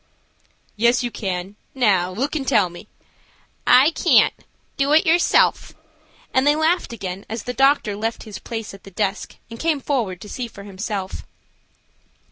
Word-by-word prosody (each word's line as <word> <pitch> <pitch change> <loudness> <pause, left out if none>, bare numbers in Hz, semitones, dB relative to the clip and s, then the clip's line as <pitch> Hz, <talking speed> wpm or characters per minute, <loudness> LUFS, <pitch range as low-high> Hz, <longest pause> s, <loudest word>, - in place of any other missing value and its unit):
"Yes, 235 +3 +3
you 240 - -2
can. 190 -1 -4 0.2
Now 195 -8 +2
look 260 +12 -3
and 275 -4 -3
tell 210 -8 +3
me." 175 +4 -12 0.8
"I 265 +5 +6
can't; - - +4 0.4
do 280 +1 +1
it 315 - +5
yourself," 340 +1 +3 0.6
and 260 +2 +3
they 295 - +5
laughed 320 +1 +1
again 195 -4 -6
as 225 0 -4
the 245 - -4
doctor 270 -6 +2
left 225 +2 -3
his 215 -2 -8
place 225 -3 -6
at 195 - -13
the - - -11
desk 195 +2 -3 0.2
and 230 - -8
came 320 -3 +1
forward 235 - -2
to - - -9
see 245 +3 -5
for 200 -3 -12
himself. 200 -1 -5
225 Hz, 160 wpm, -21 LUFS, 200-270 Hz, 0.8 s, I